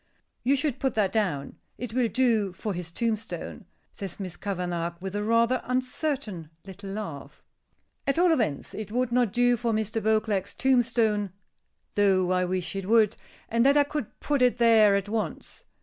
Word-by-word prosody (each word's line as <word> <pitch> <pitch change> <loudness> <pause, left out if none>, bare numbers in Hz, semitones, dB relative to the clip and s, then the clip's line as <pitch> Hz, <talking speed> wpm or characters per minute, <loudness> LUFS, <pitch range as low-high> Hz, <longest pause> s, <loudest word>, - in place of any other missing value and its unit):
"You 270 +3 +3
should 285 -2 -1
put 265 - -1
that 205 -3 +2
down. 180 -11 -1 0.2
It 245 -3 -6
will 250 -1 +2
do 225 -6 +1
for 205 +2 -4
his 175 -2 -5
tombstone," 225 +2 -3 0.3
says 195 -3 -6
Miss 185 -3 -4
Kavanagh, 175 -3 -3
with 190 +2 -5
a 205 - -1
rather 230 +3 +2
uncertain 255 - -2 0.2
little 195 +1 -9
laugh. 195 -8 -7 0.6
"At 275 - +1
all 355 0 +5
events, 215 - -1
it 210 -1 -6
would 250 +1 0
not 240 -4 +2
do 245 +2 +3
for 235 -1 -1
Mr. 220 +1 -1
Beauclerk's 215 -3 0
tombstone 230 -6 +2 0.6
though 190 -3 +3
I 185 0 +2
wish 185 +1 -3
it 195 -1 -4
would 220 -2 +4 0.3
and 230 +1 +2
that 280 +2 +5
I 290 - +6
could 290 -5 -5
put 285 -3 0
it 250 -1 +4
there 225 -4 +6
at 200 0 -1
once." 220 +1 -4
220 Hz, 170 wpm, -27 LUFS, 195-245 Hz, 0.6 s, I